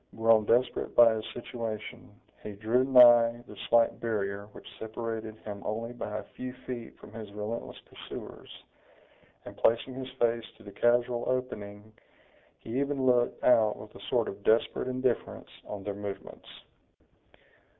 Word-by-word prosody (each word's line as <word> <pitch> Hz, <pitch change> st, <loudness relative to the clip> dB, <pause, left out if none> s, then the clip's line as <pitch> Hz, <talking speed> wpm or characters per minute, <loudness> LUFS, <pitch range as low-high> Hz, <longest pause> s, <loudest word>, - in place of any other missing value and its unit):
Grown 115 Hz, -1 st, +4 dB
desperate 120 Hz, +4 st, +1 dB
by 115 Hz, -1 st, +8 dB
his 110 Hz, 0 st, -4 dB
situation, 115 Hz, -2 st, -6 dB, 0.3 s
he 105 Hz, -, -7 dB
drew 110 Hz, +5 st, +1 dB
nigh 120 Hz, -2 st, +7 dB
the 105 Hz, -, -11 dB
slight 115 Hz, -1 st, +4 dB
barrier 100 Hz, -3 st, -2 dB
which -, -, -13 dB
separated 110 Hz, -1 st, -5 dB
him 100 Hz, -2 st, -6 dB
only 115 Hz, +3 st, -3 dB
by 120 Hz, -, -5 dB
a -, -, -5 dB
few 125 Hz, 0 st, -6 dB
feet 120 Hz, -3 st, -7 dB
from 105 Hz, -, -14 dB
his 110 Hz, -2 st, -8 dB
relentless 105 Hz, +3 st, -5 dB
pursuers, -, -, -10 dB, 1.0 s
and -, -, -9 dB
placing 115 Hz, +3 st, +2 dB
his 130 Hz, 0 st, -6 dB
face 115 Hz, -1 st, +1 dB
to 115 Hz, -, -17 dB
the 100 Hz, -, -10 dB
casual 120 Hz, +2 st, +2 dB
opening, 110 Hz, -5 st, -4 dB, 0.6 s
he 115 Hz, +4 st, -4 dB
even 140 Hz, -1 st, -1 dB
looked 125 Hz, -1 st, +2 dB
out 110 Hz, -4 st, +4 dB
with 105 Hz, +1 st, -11 dB
a -, -, -13 dB
sort 120 Hz, -2 st, +2 dB
of 100 Hz, +1 st, -7 dB
desperate 115 Hz, +3 st, +2 dB
indifference, 130 Hz, -1 st, -2 dB, 0.2 s
on 100 Hz, -2 st, -6 dB
their 100 Hz, +1 st, -3 dB
movements. 100 Hz, 0 st, -8 dB
115 Hz, 150 wpm, -29 LUFS, 105-120 Hz, 1.0 s, by